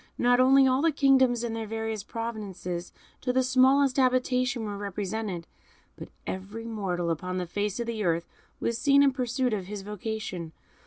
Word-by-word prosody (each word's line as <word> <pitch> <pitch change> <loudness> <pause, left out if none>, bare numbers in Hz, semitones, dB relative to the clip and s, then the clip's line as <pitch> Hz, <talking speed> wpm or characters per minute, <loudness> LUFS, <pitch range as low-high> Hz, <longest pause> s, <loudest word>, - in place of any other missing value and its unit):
Not 245 0 +3
only 265 +1 +6
all 260 +1 +3
the 330 +1 +3
kingdoms 265 -4 +3
and 230 -1 -2
their 225 -1 -4
various 225 -1 -3
provinces, 205 -7 -5 0.3
to 250 - 0
the 260 +1 +2
smallest 265 +1 +4
habitation, 255 -2 +2
were 205 -1 -4
represented; 200 -2 -4 0.5
but - - -9 0.2
every 205 +5 -6
mortal 185 -6 -2
upon 180 +3 -3
the 180 - -2
face 205 +4 -2
of 235 - -1
the 225 -2 -3
earth 170 -2 +1 0.3
was 235 0 -1
seen 280 +1 +5
in 275 -1 +4
pursuit 250 -1 0
of 190 -4 -3
his 205 -1 -6
vocation. 205 -5 -5
225 Hz, 170 wpm, -27 LUFS, 195-255 Hz, 0.5 s, only